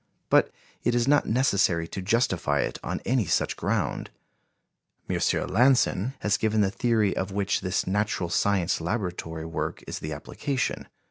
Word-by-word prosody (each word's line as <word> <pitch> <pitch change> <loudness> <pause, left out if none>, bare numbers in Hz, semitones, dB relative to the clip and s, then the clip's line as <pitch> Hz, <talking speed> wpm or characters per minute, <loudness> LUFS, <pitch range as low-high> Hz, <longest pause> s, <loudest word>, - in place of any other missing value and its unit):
But - - +5 0.3
it 120 - +1
is 120 +1 +1
not 145 +1 +4
necessary 100 -9 +2
to 95 - -5
justify 95 - +1
it - - -3
on - - -3
any 125 -3 +2
such 80 - +1
ground. - - -2 1.0
M. - - -1 0.3
Lanson 125 -1 +3
has 105 0 +2
given 110 -1 +1
the 95 -1 +2
theory 110 -2 +1
of 95 +1 -2
which 100 +1 0
this 90 -1 -1
natural 100 -2 -1
science 95 -3 +1
laboratory 85 -4 -3
work 80 -1 -4
is - - -5
the 75 - -5
application. 130 - -3
100 Hz, 150 wpm, -26 LUFS, 90-120 Hz, 1.0 s, But